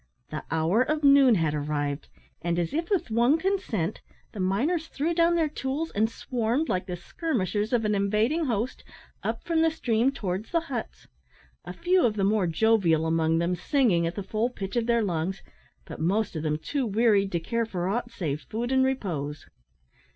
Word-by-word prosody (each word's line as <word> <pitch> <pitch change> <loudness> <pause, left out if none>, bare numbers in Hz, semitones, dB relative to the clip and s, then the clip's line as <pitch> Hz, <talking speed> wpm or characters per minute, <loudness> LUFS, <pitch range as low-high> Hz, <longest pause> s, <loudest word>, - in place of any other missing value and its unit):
The 155 - -4
hour 165 +8 +2
of 305 +3 0
noon 275 -4 +7
had 160 -5 +1
arrived, 145 -1 -2 0.3
and, 170 0 -1
as 175 +5 -1
if 330 +2 -2
with 375 - 0
one 240 +7 +4
consent, 295 - -1 0.3
the 210 - -9
miners 270 - 0
threw 320 +2 -1
down 335 0 +3
their 325 -2 +2
tools, 290 +2 -3
and 220 +2 +1
swarmed, 240 +5 -1
like 185 0 -1
the 180 - -3
skirmishers 210 - -2
of 235 -3 +1
an 210 - +1
invading 215 +11 +1
host, 235 -1 -2 0.4
up - - -3
from 330 -2 +1
the 325 - +4
stream 250 -5 +1
towards 200 -4 -4
the 335 - +2
huts 265 -8 -6 0.6
a - - -6
few 360 +1 +2
of 220 -3 +2
the 200 - 0
more 200 -2 +2
jovial 170 -3 +3
among 160 0 +2
them 170 +2 +1
singing 180 - +2
at 170 - -4
the 200 - -4
full 215 +5 -1
pitch 195 -4 -6
of 235 -1 0
their 235 -1 +3
lungs, 180 0 -2 0.4
but - - -9
most 195 +4 0
of 155 - -2
them 150 -1 0
too 270 - -2
wearied 205 -2 +3
to 170 - +1
care 230 +7 -2
for 180 -4 -3
aught 240 +5 -1
save 155 -9 -3
food 230 - -4
and 265 0 +4
repose. 165 - -2
220 Hz, 190 wpm, -27 LUFS, 175-265 Hz, 0.6 s, noon